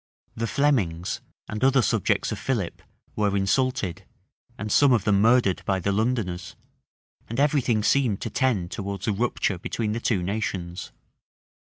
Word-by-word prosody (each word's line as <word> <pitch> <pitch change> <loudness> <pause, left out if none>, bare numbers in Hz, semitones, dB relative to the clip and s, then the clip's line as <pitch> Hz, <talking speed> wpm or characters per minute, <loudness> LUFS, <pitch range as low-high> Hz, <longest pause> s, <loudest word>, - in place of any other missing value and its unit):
The 115 0 -2
Flemings, 105 - 0 0.3
and 105 +3 -4
other 135 -1 +4
subjects - - +1
of - - -4
Philip, 110 -10 -2 0.3
were 100 -1 +1
insulted, 95 -3 0 0.5
and 105 -3 -4
some 140 +2 +5
of 115 -6 +2
them 100 -1 +3
murdered 115 -4 +3
by 95 -1 0
the 100 +2 0
Londoners; 100 -4 -1 0.7
and 115 +3 -3
every 145 0 +3
thing 115 -4 +1
seemed 120 -5 +2
to - - -4
tend 105 -10 0
towards 100 -1 -5
a 110 - +2
rupture 100 -3 -1
between 105 +3 -2
the 115 - -2
two 105 -6 0
nations. 90 -3 -3
105 Hz, 155 wpm, -25 LUFS, 95-125 Hz, 0.7 s, some